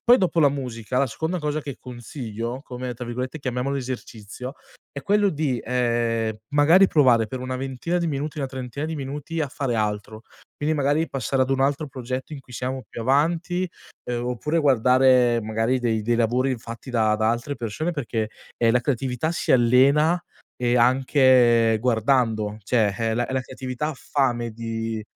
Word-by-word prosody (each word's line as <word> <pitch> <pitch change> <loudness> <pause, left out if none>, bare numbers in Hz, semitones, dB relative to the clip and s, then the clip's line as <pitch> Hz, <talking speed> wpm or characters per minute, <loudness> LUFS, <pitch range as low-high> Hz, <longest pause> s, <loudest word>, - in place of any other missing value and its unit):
poi 245 +1 +7
dopo 180 -2 0
la 145 -3 +6
musica, 125 -3 -3
la 140 - +3
seconda 160 +8 -3
cosa 150 -1 -2
che 140 -3 -6
consiglio, 120 -1 -6
come, 125 -1 -6
tra 125 +1 -7
virgolette, 125 +5 -4
chiamiamolo 130 0 -2
"esercizio", 125 -1 -6 0.4
è 140 - -7
quello 205 +4 +3
di, 145 -5 -1
ehm, 115 -3 0
magari 160 +7 +5
provare 125 -9 +4
per 125 +3 -6
una 130 0 -3
ventina 135 +6 -3
di 170 - -1
minuti, 150 +1 -3
una 135 - -1
trentina 130 +2 -5
di 160 0 -3
minuti 145 +4 -5
a 150 - +1
fare 130 -3 -2
altro, 105 +1 -3 0.3
quindi 155 +2 0
magari 145 +3 +1
passare 130 +1 0
ad 130 - -1
un 135 0 +1
altro 145 +3 +1
progetto 130 +1 -5
in 145 - -6
cui 125 - -17
siamo 130 +2 -3
più - - -7
avanti, 170 +7 +1 0.4
ehm, 120 0 -3
oppure 150 +7 -1
guardare, 125 -3 +4
magari, 110 +4 0
dei 115 -3 0
dei 120 +2 +1
lavori 125 +3 +1
fatti 115 +3 -9
da 110 -3 +2
da 110 +1 +2
altre 120 +5 -2
persone 125 +9 -3
perché, 115 -7 -3 0.3
ehm, 115 -1 +3
la 125 - +3
creatività 130 +2 -1
si 170 - 0
allena, 140 +7 +4 0.4
e 120 0 +1
anche 125 -2 +4
guardando, 110 -3 +1
cioè 110 -1 +1
la 120 +1 0
la 130 0 0
creatività 130 +3 -4
ha 155 - -4
fame 120 -4 -1
di 115 0 -4
130 Hz, 170 wpm, -24 LUFS, 115-145 Hz, 0.4 s, poi